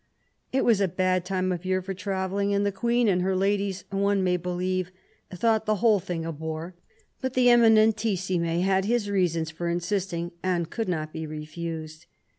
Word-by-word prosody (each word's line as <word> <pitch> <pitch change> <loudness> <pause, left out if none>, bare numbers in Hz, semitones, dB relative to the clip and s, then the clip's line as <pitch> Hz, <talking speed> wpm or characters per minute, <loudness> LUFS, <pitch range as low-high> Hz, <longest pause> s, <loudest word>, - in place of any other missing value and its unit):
It 265 - +1
was 225 -4 +4
a 195 - +3
bad 185 0 0
time 185 0 -1
of 175 -1 -3
year 185 0 +1
for 190 +1 -5
travelling, 195 +1 -1
and 200 0 +1
the 200 - +1
Queen 235 +4 +1
and 180 -3 +2
her 190 +1 0
ladies, 195 0 0
one 200 0 +1
may 180 -1 +2
believe, 180 +1 -2 0.4
thought 220 +4 +1
the 215 - +3
whole 215 -1 +3
thing 170 -2 -4
a 165 - -3
bore; 160 +3 -5 0.5
but 260 -1 -3
the 250 -1 +5
Eminentissime 215 -7 +3
had 190 0 +2
his 220 -2 0
reasons 165 -5 0
for 170 +2 -3
insisting, 175 -1 -2
and 175 -3 -1
could 225 -4 -2
not 155 -3 -3
be 160 -1 -5
refused. 155 +1 -6
185 Hz, 180 wpm, -26 LUFS, 170-205 Hz, 0.5 s, the